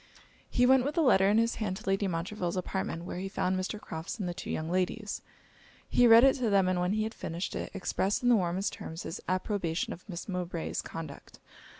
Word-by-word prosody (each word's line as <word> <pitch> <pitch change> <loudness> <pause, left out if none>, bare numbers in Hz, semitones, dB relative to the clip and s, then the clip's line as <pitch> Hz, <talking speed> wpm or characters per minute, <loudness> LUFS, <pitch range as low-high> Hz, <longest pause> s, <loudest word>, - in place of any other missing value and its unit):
He 250 - +3
went 260 0 +6
with 285 +4 -2
the 335 - +3
letter 195 -8 +5
in 210 - +4
his 230 +1 +2
hand 190 -3 -1
to 215 - -12
Lady 195 +1 +1
Montreville's 175 +1 -2
apartment, 185 -2 -3
where 180 - -5
he 195 +1 -4
found 185 -2 0
Mr. 185 +3 -3
Crofts 160 -1 -6
and 195 -5 -3
the 175 - -2
two 195 - -7
young 155 - -2
ladies. 185 +4 -1 0.7
He 245 - +5
read 230 +1 +9
it 270 -1 +7
to 245 -4 0
them; 195 -2 +4
and 185 -1 +1
when 180 +2 +1
he 215 0 +1
had 220 +1 -3
finished 170 -2 -4
it, - - -3
expressed 195 +3 0
in 245 - +4
the 240 - +7
warmest 185 0 0
terms 165 +1 -7
his 165 - -6
approbation 185 -3 -1
of 185 +5 -14
Miss 170 -2 -6
Mowbray's 180 -3 -3
conduct. 155 -4 -8
190 Hz, 225 wpm, -30 LUFS, 175-215 Hz, 0.7 s, read